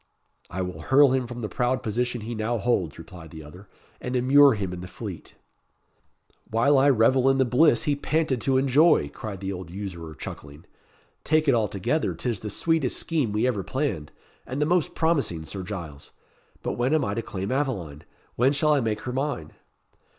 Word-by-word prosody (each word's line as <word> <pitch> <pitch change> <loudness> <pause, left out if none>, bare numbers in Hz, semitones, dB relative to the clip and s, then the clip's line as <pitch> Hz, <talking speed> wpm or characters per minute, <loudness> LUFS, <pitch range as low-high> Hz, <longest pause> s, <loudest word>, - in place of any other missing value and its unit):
"I 95 +1 -3
will 90 0 -6
hurl 135 0 +5
him 130 -2 0
from 120 0 -7
the 110 - -2
proud 125 +3 -1
position 120 +2 -1
he 115 +3 -5
now 115 +2 -1
holds," 95 -8 0
replied 80 0 -11
the 80 0 -10
other, 90 +7 -13 0.3
"and 125 +1 -3
immure 135 +2 +6
him 95 -4 -3
in 90 - -6
the 90 - -7
Fleet." - - -8 1.1
"While 135 +6 +3
I 140 +2 +5
revel 130 +1 +4
in 135 - +3
the 130 - +3
bliss 125 -1 +4
he 145 - +1
panted 145 -3 0
to 135 +2 +2
enjoy," 140 - +4
cried 100 +1 -7
the 95 0 -3
old 90 -2 -7
usurer, 85 -4 -7
chuckling. 70 +3 -9 0.6
"Take 155 0 +2
it 140 - +5
altogether, 110 - 0
'tis 120 -6 -2
the 105 - -6
sweetest 160 - 0
scheme 150 -10 -1
we 105 +3 +1
ever 120 -6 0
planned, 130 - -3 0.4
and 130 +3 -4
the 150 - +2
most 175 0 +1
promising, 140 - 0
Sir 95 +4 -6
Giles! 85 -7 -7 0.5
But - - -3
when 130 +5 +2
am 155 - +1
I 100 - -2
to 115 - -2
claim 95 -3 -5
Aveline? 100 - -2 0.3
when 130 +4 +3
shall 150 +1 +2
I 145 - +2
make 110 -3 -2
her 125 - -5
mine?" 130 - -3
120 Hz, 190 wpm, -25 LUFS, 95-135 Hz, 1.1 s, immure